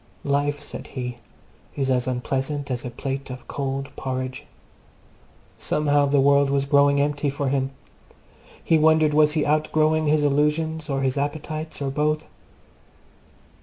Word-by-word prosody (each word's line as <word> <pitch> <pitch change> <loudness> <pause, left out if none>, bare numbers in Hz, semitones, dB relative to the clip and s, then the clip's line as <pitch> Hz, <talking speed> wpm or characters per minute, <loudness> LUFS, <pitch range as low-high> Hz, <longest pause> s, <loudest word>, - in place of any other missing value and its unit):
Life, 145 +1 0
said - - -8
he, 125 -2 -5 0.6
is 135 -2 0
as 125 0 +1
unpleasant 135 +3 -2
as 125 -1 -2
a 125 - -4
plate 135 +3 -5
of 125 -1 -9
cold 135 0 -4
porridge. 130 -1 -4 1.1
Somehow 145 -1 +2
the 140 0 +3
world 140 0 +4
was 140 0 +1
growing 140 0 +4
empty 145 0 0
for 140 0 -2
him. 135 -1 0 0.9
He 160 - +3
wondered 155 -1 +4
was 150 0 +4
he 155 -2 +1
outgrowing 155 +1 +2
his 150 0 +3
illusions, 150 +2 0
or 135 -1 -1
his 135 +1 0
appetites, 155 +1 -4
or 135 - -1
both? 150 +2 0
145 Hz, 140 wpm, -24 LUFS, 135-150 Hz, 1.1 s, world